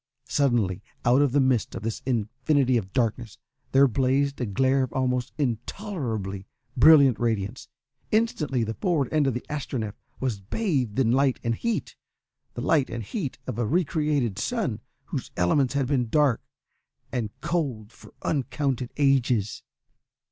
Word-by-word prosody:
Suddenly, 115 -10 +1 0.2
out 125 +4 +5
of 145 -3 +3
the 145 - +3
midst 130 -5 +1
of - - -6
this 115 0 -3
infinity 130 +3 +1
of 100 -5 -1
darkness, 115 -2 -1 0.3
there 135 +1 +6
blazed 135 +3 +1
a 125 - -1
glare 130 +6 +2
of 130 - -2
almost 125 -1 0
intolerably 120 - -3 0.3
brilliant 140 -2 +7
radiance. 115 0 -2 0.4
Instantly 155 - +1
the 110 0 -3
forward 160 - 0
end 150 -3 +3
of 130 - 0
the 125 - -4
Astronef 130 -8 -3 0.3
was 125 -6 -1
bathed 130 - -1
in 125 -4 +3
light 135 0 +2
and 115 -1 +1
heat 235 - -2 0.6
the - - -4
light 145 -5 +2
and 115 -1 -4
heat 140 - -4
of 125 -3 -4
a 120 - 0
re 175 +9 +2
created 145 - 0
sun, - - -1 0.2
whose - - -5
elements 130 +10 +2
had 140 -2 +2
been 125 -3 0
dark 145 -4 +3 0.7
and 115 -4 -2
cold 135 -9 -2
for - - -16
uncounted 135 -3 -1
ages. 125 -7 +2
130 Hz, 150 wpm, -26 LUFS, 115-140 Hz, 0.7 s, brilliant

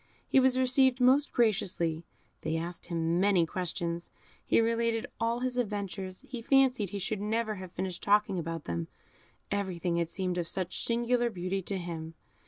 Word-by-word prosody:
He - - +5
was 260 -1 +4
received 260 0 +4
most 265 +3 +4
graciously; 175 -8 +1 0.4
they 160 +1 -1
asked 170 +1 -5
him 165 0 0
many 190 -3 +4
questions; 170 0 -3 0.3
he - - +3
related 230 0 +1
all 230 +1 0
his 250 -1 -1
adventures; 200 -4 -4
he 245 -2 -6
fancied 255 -5 +3
he 200 - -4
should 200 +1 -2
never 220 0 -1
have 185 -1 -9
finished 185 -1 -4
talking 205 -2 +3
about 165 -1 -4
them, 85 -1 -3 0.6
everything 185 -4 -1
had 170 -1 0
seemed 180 0 -2
of 170 - -2
such 185 0 -2
singular 240 +1 +1
beauty 185 -1 -2
to 195 +2 -2
him. 165 -2 -6
195 Hz, 165 wpm, -30 LUFS, 170-230 Hz, 0.6 s, He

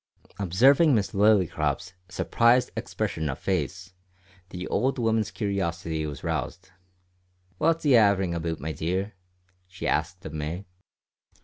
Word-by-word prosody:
Observing 130 - +4
Miss 105 -3 0
Lillycrop's 90 -6 +2 0.2
surprised 120 +1 +2
expression 80 -1 -3
of 65 - -3
face, 95 +1 -3 0.6
the 90 0 -6
old 135 +2 0
woman's 110 -3 +1
curiosity 85 -6 -2
was 75 - -7
roused. 95 +1 -4 0.9
"What's 165 +1 +2
he 145 - +3
haverin' 100 -6 +4
aboot, 85 -1 -3
my 80 +2 -4
dear?" 90 +7 -2 0.5
she 95 0 -6
asked - - -1
of 75 - -7
May. 80 +5 -4
95 Hz, 120 wpm, -26 LUFS, 80-110 Hz, 0.9 s, Observing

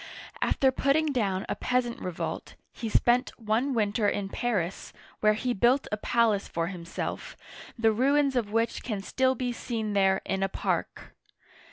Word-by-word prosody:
After 265 -1 +3
putting 285 +4 +2
down 200 -7 0
a - - -1
peasant 250 -1 -1
revolt, 180 -2 -5 0.2
he 225 - -4
spent 240 +3 +3
one 230 +5 0
winter 210 -1 +2
in 195 -1 -2
Paris, 195 -6 -2 0.3
where 215 0 +4
he 245 +3 -1
built 245 +6 +3
a 210 - 0
palace 220 -2 +1
for 165 0 -2
him 175 -3 -8
self, 170 - -5 0.4
the 225 -1 +4
ruins 275 +4 +2
of 225 -4 0
which 230 +1 0
can 210 -5 -4
still 260 +4 +1
be 250 0 -2
seen 225 -3 -3
there 195 -1 +3
in 195 0 -1
a 195 - +1
park. - - -3
225 Hz, 165 wpm, -28 LUFS, 200-250 Hz, 0.4 s, where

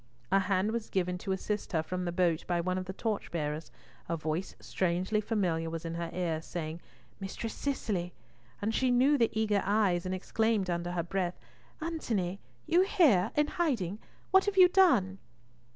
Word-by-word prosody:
A 195 - +5
hand 195 +2 +1
was 230 -1 -3
given 180 -1 -1
to 190 - -4
assist 205 +2 -3
her 160 -1 +2
from 180 +2 -3
the 175 - -1
boat 175 -2 +1
by 175 -1 +1
one 185 +2 0
of 185 - -5
the 190 - -5
torchbearers, 165 -8 -3 0.4
a 170 - 0
voice 160 +4 -3
strangely 185 +4 0
familiar 180 -7 0
was 165 0 -5
in 165 - -3
her 170 0 -3
ears, 165 -3 -2
saying, 165 -1 -5 0.4
"Mistress 205 +3 -5
Cicely!" 205 -11 -2 0.5
and 220 +2 0
she 255 +2 +2
knew 255 +4 +4
the 235 -5 +3
eager 210 -2 +2
eyes, 200 -4 +2
and 185 - -1
exclaimed 210 0 0
under 175 +1 -2
her 170 -1 -1
breath, 180 0 -2 0.4
"Antony, 220 - -2 0.3
you 340 +3 +4
here? 305 - +4
In 295 - +4
hiding? 235 - -1 0.3
What 380 0 +6
have 405 -1 -1
you 365 -1 +9
done?" 245 - +4
190 Hz, 175 wpm, -31 LUFS, 175-225 Hz, 0.5 s, you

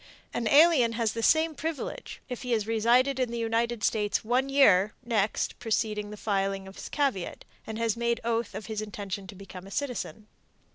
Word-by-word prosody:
An 235 -2 -1
alien 280 -3 +6
has 225 -2 0
the 230 - -3
same 315 +5 +3
privilege, 315 -1 -5
if 250 -3 -6
he 250 -2 -1
has 215 -3 +1
resided 240 +5 +3
in 255 -2 +1
the 235 - -4
United 230 0 0
States 210 0 0
one 255 +4 +1
year 210 -8 +5
next 215 -3 0
preceding 215 -3 -1
the 210 - -8
filing 195 -2 -1
of 190 - -10
his - - -8
caveat, 270 - -1 0.2
and 220 0 -5
has 230 -2 0
made 235 0 0
oath 230 0 -1
of 215 - -6
his 215 -1 -3
intention 200 -2 -5
to 195 - -10
become 190 -1 -10
a - - -10
citizen. 245 -3 -4
225 Hz, 190 wpm, -28 LUFS, 210-245 Hz, 0.2 s, alien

